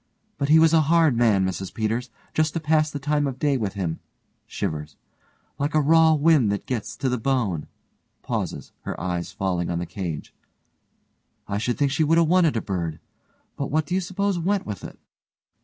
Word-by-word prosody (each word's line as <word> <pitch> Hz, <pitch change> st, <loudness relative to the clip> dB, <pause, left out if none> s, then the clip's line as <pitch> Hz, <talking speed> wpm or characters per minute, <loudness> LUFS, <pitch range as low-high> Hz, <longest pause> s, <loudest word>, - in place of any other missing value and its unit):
But 140 Hz, -, 0 dB
he 155 Hz, -, +7 dB
was 160 Hz, 0 st, +5 dB
a 160 Hz, -, +6 dB
hard 165 Hz, -5 st, +4 dB
man, 110 Hz, -5 st, +3 dB
Mrs 95 Hz, 0 st, -3 dB
Peters. 115 Hz, +3 st, -2 dB, 0.2 s
Just 155 Hz, -1 st, +1 dB
to -, -, +1 dB
pass 155 Hz, 0 st, +2 dB
the 145 Hz, -, -5 dB
time 145 Hz, +1 st, 0 dB
of 130 Hz, -2 st, -4 dB
day 145 Hz, 0 st, +1 dB
with 105 Hz, -7 st, -2 dB
him 90 Hz, -5 st, -3 dB, 0.5 s
(shivers) 75 Hz, -2 st, -4 dB, 0.6 s
Like 145 Hz, +2 st, -1 dB
a -, -, +5 dB
raw 160 Hz, +2 st, +5 dB
wind 150 Hz, -7 st, +4 dB
that 100 Hz, -, -3 dB
gets 120 Hz, -5 st, -3 dB
to 135 Hz, -, -1 dB
the 125 Hz, -1 st, 0 dB
bone, 110 Hz, -, -1 dB, 0.6 s
(pauses, -, -, -4 dB
her -, -, -5 dB
eye 90 Hz, 0 st, -2 dB
falling 90 Hz, -1 st, -2 dB
on 85 Hz, -, -1 dB
the 85 Hz, -, -2 dB
cage) 85 Hz, -6 st, -5 dB, 1.1 s
I 100 Hz, -, -2 dB
should 120 Hz, +2 st, -1 dB
think 140 Hz, -2 st, +1 dB
she 150 Hz, +3 st, +2 dB
would 160 Hz, +2 st, +3 dB
'a 170 Hz, -, +6 dB
wanted 165 Hz, -5 st, +3 dB
a -, -, 0 dB
bird. 85 Hz, -6 st, -3 dB, 0.6 s
But 140 Hz, -, -3 dB
what 155 Hz, +2 st, +1 dB
do 180 Hz, -, -4 dB
you 190 Hz, -, +2 dB
suppose 190 Hz, +1 st, -1 dB
went 195 Hz, +3 st, 0 dB
with 105 Hz, -4 st, -6 dB
it? -, -, -9 dB
135 Hz, 195 wpm, -24 LUFS, 100-155 Hz, 1.1 s, he